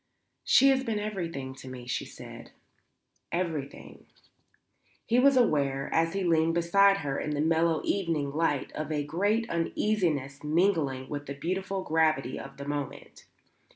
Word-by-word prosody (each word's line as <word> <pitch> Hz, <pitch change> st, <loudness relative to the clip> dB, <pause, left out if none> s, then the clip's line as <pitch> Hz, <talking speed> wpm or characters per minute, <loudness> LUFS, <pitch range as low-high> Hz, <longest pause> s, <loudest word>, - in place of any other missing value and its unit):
"She 275 Hz, -, +6 dB
has 265 Hz, -1 st, +3 dB
been 225 Hz, -4 st, -2 dB
everything 170 Hz, -11 st, -4 dB
to 130 Hz, 0 st, -12 dB
me," 125 Hz, -1 st, -8 dB
she 125 Hz, -, -3 dB
said. -, -, -11 dB, 0.8 s
"Everything." 160 Hz, -6 st, -4 dB, 1.0 s
He 235 Hz, +2 st, +3 dB
was 275 Hz, +1 st, +5 dB
aware, 140 Hz, -, +1 dB
as 165 Hz, 0 st, +2 dB
he 195 Hz, -1 st, -1 dB
leaned 165 Hz, -1 st, +2 dB
beside 195 Hz, +4 st, +4 dB
her 135 Hz, -1 st, -1 dB
in 150 Hz, 0 st, -2 dB
the -, -, -3 dB
mellow 160 Hz, +1 st, +2 dB
evening 165 Hz, -7 st, -1 dB
light, 145 Hz, -2 st, 0 dB
of 155 Hz, 0 st, -5 dB
a 150 Hz, -1 st, 0 dB
great 205 Hz, +9 st, 0 dB
uneasiness 165 Hz, -, -1 dB
mingling 150 Hz, -5 st, +1 dB
with 145 Hz, 0 st, -6 dB
the 140 Hz, -, -5 dB
beautiful 190 Hz, +5 st, -3 dB
gravity 155 Hz, -5 st, +1 dB
of 135 Hz, -, -10 dB
the 140 Hz, -, -7 dB
moment. 145 Hz, -1 st, -6 dB
160 Hz, 150 wpm, -28 LUFS, 140-190 Hz, 1.0 s, She